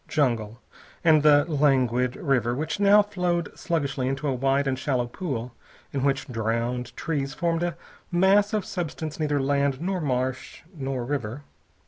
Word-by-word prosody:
Jungle, 120 -6 0 0.4
and 160 -2 +5
the 145 -1 +6
languid 130 -5 +2
river 120 -4 0
which 155 +8 -3
now 205 +1 +6
flowed 180 -4 -2
sluggishly 140 -6 -1
into 135 +2 -2
a 135 - +1
wide 135 +2 +1
and 130 -1 -1
shallow 130 -2 0
pool 125 -3 -5 0.4
in 135 -2 -1
which 140 -1 0
drowned 120 +1 -2
trees 145 -3 -2
formed 170 0 0
a 175 -2 -2 0.3
mass 195 +4 +4
of 210 -3 -1
substance 160 -3 -4
neither 150 -2 +1
land 140 0 +1
nor 185 +2 -2
marsh 130 -2 -2
nor 135 -4 -3
river. 130 -1 -3
140 Hz, 150 wpm, -25 LUFS, 125-165 Hz, 0.4 s, the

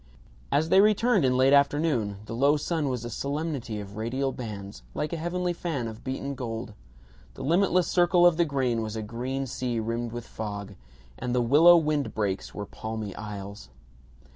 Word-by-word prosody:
As 155 +3 +2
they 190 - +7
returned 215 -1 +3
in 125 0 +2
late 130 +2 +5
afternoon 140 -8 +2
the 115 - -7
low 140 +5 +3
sun 150 -1 -1
was 125 -2 -3
a - - -4
solemnity 140 -4 -3
of 100 0 -9
radial 130 +5 -1
bands, 100 - -7
like 150 - -2
a - - 0
heavenly 175 +2 -1
fan 160 -8 -3
of 110 -1 -9
beaten 135 +1 -3
gold; 115 -4 -5 0.6
the - - -7
limitless 180 +4 +3
circle 175 0 +4
of 175 -2 +6
the 170 - +3
grain 130 -6 0
was 110 0 -4
a 110 - -3
green 125 +5 -3
sea 125 -2 -2
rimmed 115 +1 -2
with 120 0 -6
fog, 100 -2 -6 0.5
and 125 0 -2
the 125 - +3
willow 160 +8 +7
wind 150 -3 0
breaks 100 -3 -2
were 105 - -6
palmy 110 -1 -6
isles. 100 - -7
130 Hz, 180 wpm, -27 LUFS, 110-155 Hz, 0.6 s, they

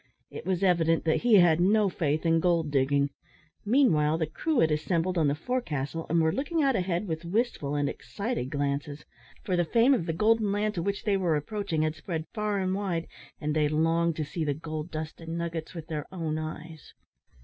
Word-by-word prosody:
It - - -8
was 190 0 0
evident 165 -3 +3
that 160 - +2
he 240 -2 +5
had 175 -4 +6
no 205 +3 +4
faith 155 -3 -1
in 165 0 +4
gold 165 -3 +1
digging. 140 +1 +2 0.5
Meanwhile 200 - +3
the 160 - 0
crew 275 - -1
had 160 - +3
assembled 165 +4 0
on 160 -4 +2
the 140 - +1
forecastle, 165 - -3
and 170 +2 +3
were 160 0 +3
looking 300 - -1
out 270 -2 +3
ahead 180 0 -1
with 160 0 -3
wistful 170 - -1
and 145 -1 +1
excited 200 - -4
glances; 145 +1 -3 0.4
for 190 -4 0
the 175 - +2
fame 235 - +4
of 185 -10 0
the 165 - 0
golden 215 +3 +2
land 210 +1 0
to 170 - -2
which 200 +3 -2
they 205 -2 +2
were 175 -4 +1
approaching 165 0 -2
had 155 0 0
spread 160 -1 -5
far 210 -1 -1
and 185 -1 0
wide, 185 -4 -2 0.3
and 150 0 -2
they 150 -1 +2
longed 165 +2 +1
to 155 - -2
see 160 +3 -4
the 145 -2 0
gold 155 +1 -5
dust 155 0 -6
and 165 0 -5
nuggets 170 0 -4
with 165 -2 -6
their 155 -3 -5
own 160 -4 -3
eyes. 155 0 -8
165 Hz, 205 wpm, -28 LUFS, 155-195 Hz, 0.5 s, had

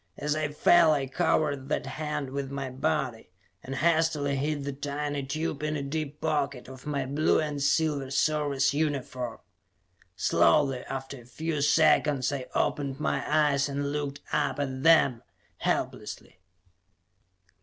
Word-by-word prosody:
As 150 +1 -1
I 155 -1 0
fell, 160 +2 +5
I 140 -2 0
covered 140 +1 0
that - - -1
hand 150 0 -4
with 140 0 -3
my 140 -1 -4
body 135 -6 -2 0.3
and 135 - -5
hastily 160 -3 +2
hid 145 +1 -1
the 140 0 -3
tiny 145 +1 -3
tube 155 +2 -3
in 155 0 -1
a 140 - -3
deep 150 +1 -4
pocket 140 -4 -1
of 130 +1 -11
my 140 -3 -1
blue 145 +4 +2
and 150 -2 -2
silver 145 -1 +1
Service 140 -1 +1
uniform. 135 -5 -2 0.8
Slowly, 125 - +3
after 135 -1 -5
a - - -17
few 155 +4 -3
seconds, 150 -2 +3
I 130 -2 -4
opened 140 -1 -1
my - - 0
eyes 145 -2 +3
and 140 0 -2
looked 145 -1 -3
up - - 0
at 130 -2 -3
them, 140 -6 +5 0.4
helplessly. - - -3
145 Hz, 145 wpm, -28 LUFS, 135-150 Hz, 0.8 s, fell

